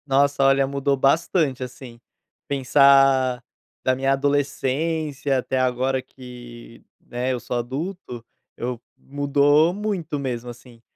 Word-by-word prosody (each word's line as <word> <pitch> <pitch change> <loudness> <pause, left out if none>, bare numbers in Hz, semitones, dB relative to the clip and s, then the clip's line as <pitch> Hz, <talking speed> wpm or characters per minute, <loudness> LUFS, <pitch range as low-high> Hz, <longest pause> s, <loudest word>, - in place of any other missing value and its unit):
Nossa, 140 0 +2
olha, 135 0 +4
mudou 140 0 -1
bastante 140 -1 +1
assim. 125 -1 -10 0.5
Pensar 135 -2 +4 0.4
da 130 - +2
minha 135 +1 +1
adolescência 145 +1 -1
até 130 +1 -2
agora, 130 +1 0
que, 120 -3 -13 0.2
né, 125 +2 -4
eu 125 - -3
sou 120 - -4
adulto, 130 +1 -5 0.3
eu 120 0 -4 0.2
mudou 145 +3 +2
muito 190 -7 -3
mesmo. 125 -3 -4
Assim, 120 -1 -14
135 Hz, 115 wpm, -22 LUFS, 125-145 Hz, 0.5 s, olha